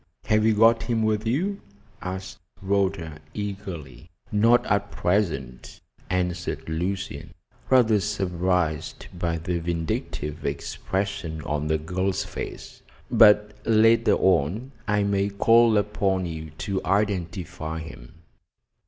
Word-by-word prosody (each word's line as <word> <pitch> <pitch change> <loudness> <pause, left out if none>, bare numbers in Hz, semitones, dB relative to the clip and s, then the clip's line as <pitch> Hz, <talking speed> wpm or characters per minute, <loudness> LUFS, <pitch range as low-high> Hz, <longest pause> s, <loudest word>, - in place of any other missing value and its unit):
Have 110 0 +3
you 110 - +3
got 115 +2 +5
him 115 -2 0
with 110 0 0
you?" 185 - -1 0.4
asked 95 0 -6 0.2
Rhoda 95 -5 -1 0.2
eagerly. 95 -7 -6 0.2
"Not 115 +4 +4
at 100 0 0
present," 85 - -2 0.3
answered 90 -1 -2
Lucian, 85 -1 -4 0.3
rather 115 -5 +5
surprised 90 -5 -1
by 85 -2 -2
the 85 +2 -2
vindictive 80 -2 -3
expression 80 +2 -3
on 75 0 -2
the 80 0 +2
girl's 90 +5 -1
face. - - -8 0.3
"But 105 0 +6
later 115 +1 +4
on 95 - +1 0.2
I 105 0 +2
may 100 0 +1
call 115 +2 +4
upon 100 -2 0
you 80 -2 -6 0.2
to 95 -2 -2
identify 90 -5 -1
him." 65 -5 -10
95 Hz, 110 wpm, -25 LUFS, 80-105 Hz, 0.4 s, But